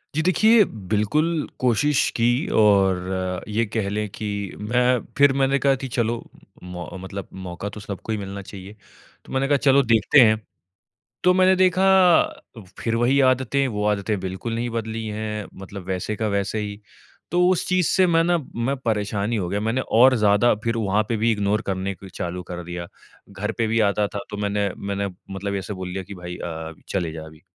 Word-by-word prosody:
जी, 160 - +2
देखिए 215 +5 +5 0.3
बिल्कुल 150 +10 +1
कोशिश 130 +4 +2
की 115 - +1 0.4
और 95 -2 +2
ये 110 +2 0
कह 105 -1 -2
लें 105 +1 -2
की 110 - -6 0.3
मैं 125 +3 +2 0.2
फिर 140 -1 +6
मैंने 135 +1 +2
कहा 140 -1 +3
की - - -2
चलो 120 0 0 0.5
म 90 -1 -7 0.2
मतलब 95 0 -6 0.2
मौका 90 +3 -5
तो - - -7
सबको 105 +2 -6
ही 110 - 0
मिलना 100 0 -6
चाहिए। 100 +1 -10 0.5
तो - - -11
मैंने 135 +1 +1
कहा 145 -1 +3
चलो 140 0 +4
देखते 115 +5 +4
हैं, 110 -2 +5 0.9
तो 180 0 +5
मैंने 185 0 +5
देखा 185 0 +3 0.9
फिर 115 -1 -1
वही 130 +4 +3
आदतें 130 +2 +1
वो 105 -2 -3
आदतें 105 0 0
बिल्कुल 95 +5 -4
नहीं 120 +1 -2
बदली 115 0 -4
हैं 105 0 -4
मतलब 95 -1 -8
वैसे 95 +3 -2
का 110 -1 -1
वैसे 100 +2 -1
ही। 105 0 -5 0.5
तो 180 +1 +3
उस 185 - +1
चीज़ 185 -2 +2
से 185 -1 +4
मैं 165 -1 +3
न 170 -4 +1 0.2
मैं 140 +1 0
परेशान 105 -3 -1
ही - - +1
हो 90 -3 -2
गया 100 +2 -1
मैंने 115 +4 0 0.2
और 130 +1 +7
ज़्यादा 105 +2 +4
फिर 115 0 0
वहाँ 105 -1 +1
पे 115 - 0
भी 115 +2 +2
इग्नोर 105 +1 0
करने 95 0 -2
फिर 95 -1 -11
चालू 90 +1 -4
कर 90 0 -5
दिया। 85 0 -6 0.5
घर 105 +3 -3
पे 115 - +2
भी 115 +1 +1
आता 105 +1 0
था - - -2
तो 105 - -5
मैंने 100 0 0
मैंने 100 0 -3 0.3
मतलब 100 +1 -3
ऐसे 100 +1 -5
बोल 95 -1 -6
दिया 95 0 -3
की 100 +2 -10
भाई 90 0 -7
अ, 80 -1 -6 0.2
चले 85 -4 -2
जा 80 -1 -7
अभी। 80 0 -14
105 Hz, 195 wpm, -23 LUFS, 100-125 Hz, 0.9 s, और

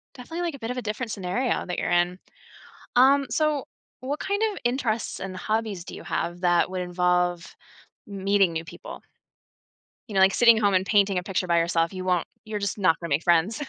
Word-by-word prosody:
definitely, 325 +7 -6
like, 335 -5 -2
a - - -12
bit 225 +2 -4
of 250 - -5
a - - -2
different 220 +2 -4
scenario 200 +6 -1
that 180 - -4
you're - - -1
in, 175 +1 +2 0.8
um, 275 +2 +6
so 300 0 +1 0.4
what 280 +4 -4
kind 405 +2 -1
of - - -7
interests 240 -3 -1
and 190 -1 -6
hobbies 215 -2 -2
do - - -9
you - - -9
have 175 +1 -3
that 175 0 +3
would 185 -1 -3
involve 180 -1 0 0.6
meeting 195 -2 +1
new 165 +1 -4
people? - - -10 1.1
You 210 - -8
know, 190 - +3
like 190 0 +5
sitting 235 -2 +6
home 200 -3 +2
and 185 - +2
painting 200 -3 +3
a 180 - -2
picture 185 -1 -2
by 170 -1 +3
yourself, 165 0 +1
you 185 -1 -6
won't 180 -2 +1 0.2
you're 215 -1 -4
just 200 -2 -2
not 185 -5 +3
gonna 170 - -5
make 145 +4 +1
friends. 175 - +2
195 Hz, 205 wpm, -25 LUFS, 180-235 Hz, 1.1 s, um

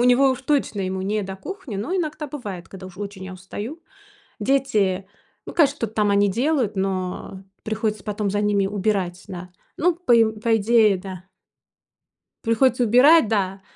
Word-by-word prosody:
у - - +3
него 255 +2 +5
уж 260 - -3
точно 265 -7 0
ему 190 0 -2
не 210 +2 -1
до 190 0 -6
кухни, 290 - -8
но 225 - -3
иногда 305 -4 -2
бывает, 205 - -7
когда 190 -1 -10
уж 185 +1 -13
очень 200 -2 -6
я 190 - -7
устаю. 210 - -7 0.6
Дети, 210 -7 +1 0.4
ну, - - -8
конечно, 290 -4 +3
что-то 220 -2 -3
там 210 -1 +2
они 200 0 +4
делают, 245 0 0
но 190 0 -3 0.2
приходится 215 -2 -2
потом 210 -1 -2
за 205 +1 0
ними 205 -2 +2
убирать, 195 -3 -1
да. 180 -2 -8 0.3
Ну 350 0 +2
по 345 -7 -2
и 230 -1 +7 0.2
по 225 +1 +2
идее, 220 -2 +4
да. 185 -1 -8 1.2
Приходится 245 +2 +3
убирать, 250 +4 +6
да. 195 -3 -1
210 Hz, 170 wpm, -23 LUFS, 190-250 Hz, 1.2 s, и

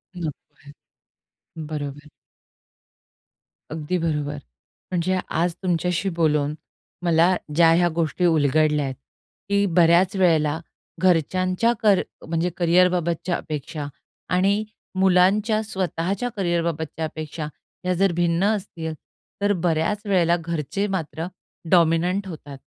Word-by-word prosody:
नको 170 -3 -2 0.3
आहे. 145 - -12 1.0
बरोबर. 145 0 -5 1.6
अगदी 160 +3 -2
बरोबर. 150 -3 -2 0.5
म्हणजे 185 +1 0 0.2
आज 175 0 +1
तुमच्याशी 180 +1 0
बोलून 150 -2 +2 0.5
मला 170 +2 +4 0.2
ज्या 165 0 +6
ह्या 175 +1 +4
गोष्टी 165 +3 0
उलगडल्या 150 -2 +3
आहेत, 130 -1 -4 0.5
की 200 0 +3
बऱ्याच 175 +3 +5
वेळेला 160 -4 +2 0.4
घरच्यांच्या 185 +5 +2
कर 205 -4 +4 0.3
म्हणजे 165 +2 0
करिअरबाबतच्या 175 -1 +2
अपेक्षा 150 0 -5 0.5
आणि 200 +3 +2 0.4
मुलांच्या 195 +4 +3
स्वतःच्या 190 +2 -2
करिअरबाबतच्या 165 -3 -1
अपेक्षा, 155 0 -5 0.4
या 185 - +2
जर 195 -2 +4
भिन्न 170 +1 +1
असतील 165 -5 -5 0.5
तर 205 0 +3
बऱ्याच 175 +5 +1
वेळेला 175 -4 +3
घरचे 170 +3 -3
मात्र 165 -4 -3 0.5
डॉमिनंट 175 +3 +3
होतात 145 -5 -9
170 Hz, 105 wpm, -23 LUFS, 155-185 Hz, 1.6 s, ज्या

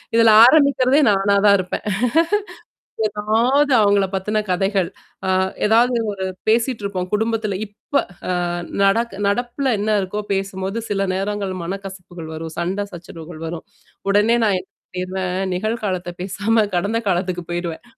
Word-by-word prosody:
இதில 230 -1 +6
ஆரம்பிக்கிறதே 280 0 +5
நானா 200 +1 +2
தான் 200 - +7
இருப்பேன். 185 +2 -4 1.2
ஏதாவது 225 +7 +1
அவங்களைப் 200 -2 +2
பத்தின 210 +3 0
கதைகள், 195 0 +1 0.4
அ - - +1 0.4
ஏதாவது 235 +3 +3
ஒரு 190 -1 -5 0.2
பேசிட்டுருப்போம். 215 -5 0
குடும்பத்தில் 220 -2 0
இப்ப 205 +7 -2 0.5
அ - - -2 0.3
நடக் 225 +3 +2
நடப்பில்ல 245 +5 0
என்ன 215 +1 +1
இருக்தோ 195 +3 -3
பேசும்பொழுது 195 +2 -3
சில 195 -1 0
நேரங்கள் 200 0 -2
மனக்கசப்புகள் 185 -3 -7
வரும், 160 0 -6
சண்டை 190 +4 -1
சச்சரவுகள் 165 -1 -9
வரும். 165 0 -6 0.4
உடனே 210 +4 +4
நான் 200 -3 +2
என்ன 185 - -27 0.2
பண்ணிடுவேன் 185 0 -2 0.2
நிகழ் 215 +5 -2
காலத்தைப் 180 -2 -4
பேசாம 210 +3 +1
கடந்த 205 +6 0
காலத்திற்குப் 180 -1 -2
போய்விடுவேன். 175 -1 -4
200 Hz, 125 wpm, -20 LUFS, 185-220 Hz, 1.2 s, தான்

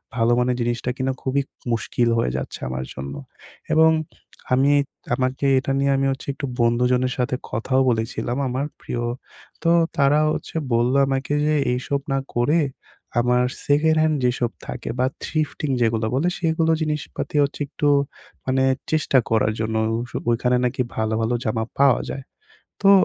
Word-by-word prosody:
ভালো 115 -1 +2
মানের 125 0 +1
জিনিসটা 120 +1 -1
কিনা 130 0 0
খুবই 135 +1 +1 0.3
মুশকিল 115 +1 0
হয়ে 115 - +1
যাচ্ছে - - -5
আমার 65 0 -3
জন্য। 70 +2 -6 0.6
এবং 160 0 +6 0.6
আমি 135 +3 +4 0.4
আমাকে 130 +1 -1
এটা 135 - -3
নিয়ে 140 0 +2
আমি 135 - +1
হচ্ছে 135 - -6
একটু 135 - -5 0.2
বন্ধুজনের 125 +2 +2
সাথে 125 0 0 0.2
কথাও 130 +4 +1
বলেছিলাম 120 +2 -1
আমার 130 +3 -1
প্রিয়। 120 -1 -4 0.6
তো 165 - +4 0.3
তারা 140 +1 +4
হচ্ছে - - -5 0.2
বললো 120 +3 +3
আমাকে 135 +1 -1
যে 155 0 +2 0.2
এইসব 130 +3 -1
না - - +2 0.2
করে 145 +8 +3 0.6
আমার 125 +1 +3 0.2
সেকেন্ড 155 +2 +3
হ্যান্ড 155 -1 +2
যেসব 120 -1 +1 0.2
থাকে - - -5
বা 130 - +3 0.2
থিফটিং 155 -2 -2
যেগুলো 115 -1 +2
বলে 145 +7 +1
সেগুলো 165 -1 +2
জিনিসপাতি 150 -1 -3
হচ্ছে 140 +1 -3
একটু 145 +1 -1 0.6
মানে 130 0 +2 0.3
চেষ্টা 155 -3 +2
করার 110 -1 +2
জন্য। 110 0 -1 0.2
ওইসব 120 +1 -4
ওইখানে 125 +1 +2
নাকি 125 +2 0
ভালো, 110 0 0
ভালো 115 +2 +1
জামা 110 0 0 0.2
পাওয়া 140 -3 +5
যায়। 135 - -6 0.6
তো 195 - +7
130 Hz, 155 wpm, -22 LUFS, 120-140 Hz, 0.6 s, তো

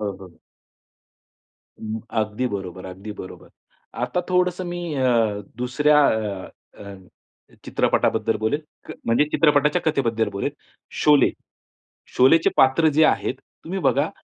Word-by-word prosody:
हो, 105 -1 -2
हो. 95 -2 -13 1.5
अ, - - -16 0.4
अगदी 110 +4 -2
बरोबर, 95 -3 -6
अगदी 95 +3 -8
बरोबर. 95 - -11 0.5
आता 125 +8 -1
थोडंसं 180 0 +1
मी 175 0 -5
अ, 115 -6 +1 0.2
दुसऱ्या 145 +5 +2
अ, 105 -4 -3 0.3
अ, 100 -1 -9 0.7
चित्रपटाबद्दल 110 - +1
बोलेल. 110 +8 -1 0.3
क - - -7
म्हणजे 115 +5 +3
चित्रपटाच्या 150 +1 +3
कथेबद्दल 115 -7 0
बोलेल. 100 +8 -2 0.5
शोले, 145 -3 +5 0.9
शोलेचे 135 +6 +5
पात्र 135 +5 +4
जे 160 - +7
आहेत, - - 0 0.3
तुम्ही 190 +4 -4
बघा 140 +4 0
125 Hz, 120 wpm, -22 LUFS, 105-150 Hz, 1.5 s, जे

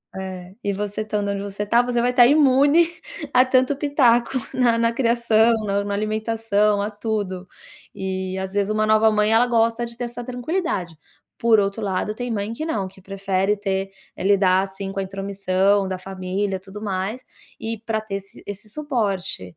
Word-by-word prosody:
é. 185 -1 -7
E 200 - 0
você 205 +1 -3
estando 210 -1 -2
onde 200 - -3
você 200 +1 -4
tá, 235 +3 +4
você 240 -1 0
vai 245 +1 +2
tá 245 -1 +7
imune 285 +4 +5 0.5
a 250 +1 +6
tanto 255 +2 +2
pitaco 265 -3 +2 0.2
na 250 -2 +4
na 230 0 +2
criação, 235 -2 +3
na 200 0 0
na 200 0 -3
alimentação, 215 -1 +1
a 205 - -1
tudo, 205 -4 -3 0.5
e 190 -1 -3
às 190 - -5
vezes 205 +1 +1
uma 215 0 +1
nova 215 0 +5
mãe 210 +1 +2
ela 230 +2 +5
gosta 230 0 +1
de 235 0 -10
ter 245 - -3
essa 240 0 -6
tranquilidade, 245 - -3 0.4
por 230 -2 +4
outro 200 +2 -1
lado, 195 +2 -1
tem 245 +1 -4
mãe 205 +1 -2
que 310 - -4
não, 205 -12 -2
que 190 0 -16
prefere 195 +1 0
ter, 195 -1 -2 0.3
eh, - - -5
lidar 190 -1 +4
assim 195 0 -7
com 195 - -4
a - - 0
intromissão 195 0 +1
da 185 -1 -3
família, 190 +1 -3
tudo 195 +2 -11
mais 200 +4 -3 0.4
e 225 0 -3
pra 220 -1 -1
ter 215 -2 -5
esse 195 - -14
esse 205 +2 -7
suporte. 220 - -2
210 Hz, 185 wpm, -22 LUFS, 195-235 Hz, 0.5 s, tá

